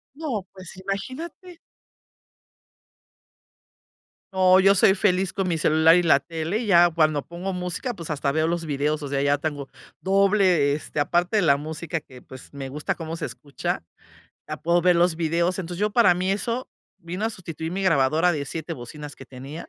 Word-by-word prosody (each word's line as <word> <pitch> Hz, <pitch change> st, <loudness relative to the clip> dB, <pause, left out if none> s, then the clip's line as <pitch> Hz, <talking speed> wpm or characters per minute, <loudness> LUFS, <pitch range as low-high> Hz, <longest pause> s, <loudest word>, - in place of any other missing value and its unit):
No, 260 Hz, -, -4 dB
pues 185 Hz, -1 st, -11 dB
imagínate. 270 Hz, -, -6 dB, 2.8 s
No, 185 Hz, 0 st, +5 dB
yo 195 Hz, +1 st, +5 dB
soy 190 Hz, -, +5 dB
feliz 190 Hz, -2 st, +1 dB
con 195 Hz, -2 st, -2 dB
mi 165 Hz, -, 0 dB
celular 160 Hz, +2 st, +5 dB
y 175 Hz, -, +2 dB
la 140 Hz, -4 st, +5 dB
tele, 165 Hz, +5 st, -3 dB
y 235 Hz, -, -4 dB
ya 175 Hz, -3 st, +6 dB
cuando 155 Hz, -3 st, +1 dB
pongo 175 Hz, +3 st, -5 dB
música, 180 Hz, +7 st, -4 dB
pues, 170 Hz, -6 st, -8 dB
hasta 145 Hz, -2 st, -1 dB
veo 155 Hz, +2 st, +1 dB
los 170 Hz, 0 st, -2 dB
videos, 150 Hz, 0 st, -1 dB
o 145 Hz, -, -4 dB
sea, 140 Hz, 0 st, -1 dB
ya 145 Hz, 0 st, +2 dB
tengo 145 Hz, -2 st, -4 dB, 0.3 s
doble, 190 Hz, -6 st, +3 dB
este, 150 Hz, 0 st, -3 dB
aparte 175 Hz, +7 st, +1 dB
de 205 Hz, -, +2 dB
la 140 Hz, -4 st, +4 dB
música 160 Hz, +2 st, -4 dB
que, 130 Hz, -3 st, -15 dB
pues, 130 Hz, +2 st, -13 dB
me 135 Hz, -1 st, -6 dB
gusta 150 Hz, +3 st, -3 dB
cómo 165 Hz, -1 st, -6 dB
se -, -, -4 dB
escucha, 140 Hz, -, -5 dB, 0.7 s
ya -, -, -5 dB
puedo 170 Hz, +1 st, +1 dB
ver 180 Hz, 0 st, +4 dB
los 175 Hz, -1 st, +3 dB
videos, 170 Hz, +3 st, 0 dB
entonces, 175 Hz, 0 st, -6 dB
yo 210 Hz, 0 st, +1 dB
para 225 Hz, -7 st, +5 dB
mí 185 Hz, +2 st, 0 dB
eso 230 Hz, +5 st, -2 dB, 0.3 s
vino 180 Hz, +3 st, -5 dB
a -, -, 0 dB
sustituir 165 Hz, -5 st, -6 dB
mi 195 Hz, +2 st, -3 dB
grabadora 160 Hz, 0 st, +3 dB
de 150 Hz, -4 st, -2 dB
7 165 Hz, +3 st, -5 dB
bocinas 145 Hz, +4 st, -9 dB
que 135 Hz, -, -12 dB
tenía. 135 Hz, +6 st, -9 dB
170 Hz, 185 wpm, -24 LUFS, 150-190 Hz, 2.8 s, ya